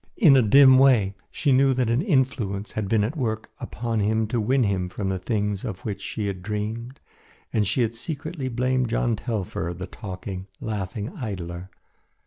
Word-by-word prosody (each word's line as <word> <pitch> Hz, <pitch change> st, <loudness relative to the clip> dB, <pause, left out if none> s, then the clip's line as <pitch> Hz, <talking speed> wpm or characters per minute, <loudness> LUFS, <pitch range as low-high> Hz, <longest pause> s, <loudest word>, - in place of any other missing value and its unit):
In 160 Hz, -, +7 dB
a 130 Hz, -, +6 dB
dim 130 Hz, +3 st, +7 dB
way 120 Hz, -8 st, +5 dB, 0.2 s
she 145 Hz, -, 0 dB
knew 135 Hz, 0 st, +4 dB
that 125 Hz, -3 st, +1 dB
an 120 Hz, +4 st, +2 dB
influence 125 Hz, -, 0 dB
had 110 Hz, -2 st, -3 dB
been 110 Hz, -1 st, +3 dB
at 120 Hz, +10 st, -2 dB
work 110 Hz, -7 st, -3 dB
upon 115 Hz, 0 st, -3 dB
him 110 Hz, +2 st, +1 dB
to 115 Hz, -1 st, 0 dB
win 130 Hz, +4 st, +2 dB
him 95 Hz, -4 st, 0 dB
from 95 Hz, +1 st, -3 dB
the 95 Hz, -1 st, -1 dB
things 105 Hz, -1 st, -1 dB
of 105 Hz, -7 st, -5 dB
which 100 Hz, -3 st, -4 dB
she 105 Hz, -, -4 dB
had 95 Hz, -2 st, -3 dB
dreamed 110 Hz, +6 st, -4 dB, 0.5 s
and 105 Hz, -3 st, +2 dB
she 125 Hz, +6 st, +2 dB
had 115 Hz, 0 st, -1 dB
secretly 145 Hz, +2 st, -4 dB
blamed 125 Hz, 0 st, 0 dB
John 120 Hz, 0 st, +1 dB
Telfer, 100 Hz, -6 st, -3 dB
the 95 Hz, -, -5 dB
talking, 95 Hz, -1 st, -7 dB
laughing 105 Hz, -, -4 dB
idler. 95 Hz, -, -5 dB
110 Hz, 180 wpm, -25 LUFS, 100-130 Hz, 0.5 s, In